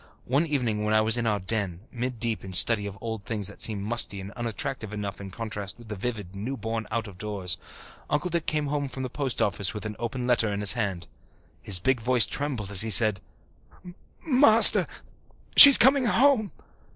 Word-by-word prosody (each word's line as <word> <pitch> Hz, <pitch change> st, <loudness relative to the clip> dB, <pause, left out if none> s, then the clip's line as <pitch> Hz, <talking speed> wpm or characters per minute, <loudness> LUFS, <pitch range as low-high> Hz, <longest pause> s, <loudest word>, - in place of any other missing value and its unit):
One 140 Hz, +7 st, -1 dB
evening 120 Hz, -8 st, -3 dB
when 105 Hz, 0 st, -1 dB
I 110 Hz, -, +3 dB
was 110 Hz, +1 st, +1 dB
in 120 Hz, -1 st, -3 dB
our 105 Hz, -2 st, -1 dB
"den," 95 Hz, -3 st, -5 dB
mid 125 Hz, -1 st, -6 dB
deep 115 Hz, -1 st, -4 dB
in 95 Hz, -1 st, -10 dB
study 105 Hz, +3 st, +3 dB
of 100 Hz, -1 st, -10 dB
old 110 Hz, -3 st, -7 dB
things 105 Hz, -3 st, -5 dB
that 100 Hz, -, -5 dB
seemed 105 Hz, -3 st, 0 dB
musty 105 Hz, -2 st, -2 dB
and 95 Hz, +1 st, -10 dB
unattractive 120 Hz, -1 st, -5 dB
enough 100 Hz, -1 st, -7 dB
in 100 Hz, -, -9 dB
contrast 105 Hz, -1 st, -8 dB
with 120 Hz, -2 st, -17 dB
the 105 Hz, -, -6 dB
vivid, 105 Hz, -3 st, -7 dB
newborn, 110 Hz, 0 st, -6 dB
out 115 Hz, -1 st, -4 dB
of 95 Hz, -3 st, -14 dB
doors, 95 Hz, -5 st, -3 dB, 0.5 s
Uncle 170 Hz, +5 st, -3 dB
Dick 170 Hz, -1 st, -2 dB
came 150 Hz, -1 st, -2 dB
home 145 Hz, -1 st, -4 dB
from 130 Hz, 0 st, -8 dB
the 130 Hz, -, -7 dB
post 135 Hz, -3 st, -3 dB
office 100 Hz, 0 st, -3 dB
with 105 Hz, -, -8 dB
an 105 Hz, 0 st, -7 dB
open 125 Hz, +1 st, -6 dB
letter 120 Hz, -3 st, 0 dB
in 100 Hz, 0 st, -5 dB
his 100 Hz, -, +4 dB
hand. 100 Hz, -8 st, -5 dB, 0.6 s
His 100 Hz, -, +3 dB
big 125 Hz, +6 st, -1 dB
voice 125 Hz, 0 st, +2 dB
trembled 130 Hz, -9 st, -5 dB
as 95 Hz, -, +8 dB
he 110 Hz, -, +2 dB
said, 105 Hz, -2 st, +4 dB, 1.0 s
"Master, 255 Hz, -6 st, +6 dB, 0.7 s
she's 280 Hz, -2 st, +12 dB
coming 265 Hz, +1 st, +3 dB
home. 235 Hz, -2 st, +1 dB
110 Hz, 200 wpm, -24 LUFS, 100-130 Hz, 1.0 s, she's